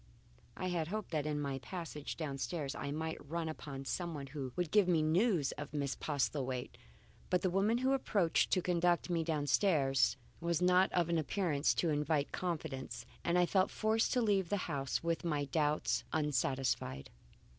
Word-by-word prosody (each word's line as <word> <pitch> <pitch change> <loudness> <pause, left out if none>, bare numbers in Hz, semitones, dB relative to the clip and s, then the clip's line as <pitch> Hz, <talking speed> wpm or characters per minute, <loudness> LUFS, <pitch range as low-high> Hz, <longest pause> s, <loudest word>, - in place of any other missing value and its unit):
I 185 - -2
had 170 -3 -1
hoped 210 +1 -4
that 155 -2 -1
in 150 -1 -1
my 140 -2 -2
passage 165 -2 -6
downstairs 145 -1 -3
I 140 - -4
might 160 +1 -3
run 165 +3 -3
upon 140 -3 -6
someone 160 -2 -3
who 135 -2 -5
would 175 -3 -1
give 210 -3 +5
me 165 -3 +3
news 165 - +2
of 145 +1 -6
Miss 140 -2 -1
Postlethwaite, 135 -3 -2 0.5
but 180 - +2
the 185 - +2
woman 200 +5 +2
who 260 +2 +2
approached 200 -10 +2
to 185 - +2
conduct 175 0 +2
me 165 -1 +1
downstairs 145 -3 +2 0.2
was 170 -1 0
not 180 +1 +4
of 175 -2 +1
an 170 -1 +2
appearance 155 -2 +1
to 170 - +1
invite 150 0 0
confidence, 135 -9 -4 0.2
and 170 +1 +2
I 180 - +5
felt 185 +2 +2
forced 220 +1 +1
to 250 - +2
leave 195 -5 +2
the 205 - +1
house 140 -3 -2
with 165 +1 -1
my 150 -4 0
doubts 150 +1 +1
unsatisfied. 135 - -1
160 Hz, 170 wpm, -35 LUFS, 145-180 Hz, 0.5 s, give